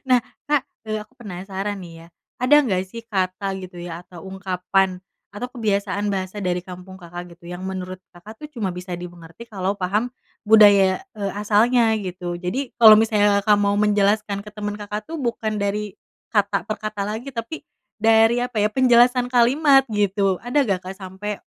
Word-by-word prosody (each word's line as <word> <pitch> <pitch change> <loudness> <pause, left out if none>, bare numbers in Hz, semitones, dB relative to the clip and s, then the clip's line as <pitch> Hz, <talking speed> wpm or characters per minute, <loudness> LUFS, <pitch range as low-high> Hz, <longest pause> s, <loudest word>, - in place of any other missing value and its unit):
Nah, 250 -1 +5 0.3
Kak, 295 -3 +3 0.2
eee, 215 0 -2
aku 215 +4 -13
penasaran, 195 -1 -5
nih, 165 -2 -11
ya, - - -15 0.3
ada 255 +4 +4
nggak, 190 -7 0
sih, 230 +5 -9
kata, 190 -1 -1
gitu, 180 -2 -9
ya, 175 0 -7
atau 175 -2 -13
ungkapan, 190 0 -1 0.3
atau 245 +5 -5
kebiasaan 205 -3 -1
bahasa 190 +1 -4
dari 180 0 0
kampung 185 +1 -11
Kakak, 175 0 -9
gitu, 170 0 -15
yang 180 +1 -7
menurut 185 -1 -5 0.2
Kakak, 215 - -12
tuh, - - -7
cuma 220 -7 -2
bisa 180 0 -7
dimengerti 175 +5 -10
kalau 195 -2 -2
paham 210 +6 -1 0.3
budaya, 205 -3 +6 0.2
eee, 200 -2 -3
asalnya, 225 +2 +3
gitu? 180 -2 -5
Jadi 215 +10 -4
kalau 225 -2 +9
misalnya 205 -2 +3
Kakak 210 0 +4
mau 200 0 +2
menjelaskan 210 0 +2
ke 210 - -10
temen 205 -1 -4
Kakak, 210 +2 -6
tuh, 330 - -4
bukan 230 -5 -2
dari 200 0 -2 0.3
kata 205 -2 +1
per 215 - -2
kata 215 -1 -4
lagi, 240 +6 -5
tapi 230 +8 -6 0.3
dari 225 +1 +4
apa, 240 -4 -2
ya, 210 - +3
penjelasan 245 0 +4
kalimat, 270 +3 +5
gitu, 200 -2 +1
ada 255 +4 +1
nggak, 195 -8 0
Kak, 190 - -4
sampai, 195 +2 -6
205 Hz, 175 wpm, -22 LUFS, 185-225 Hz, 0.3 s, kalau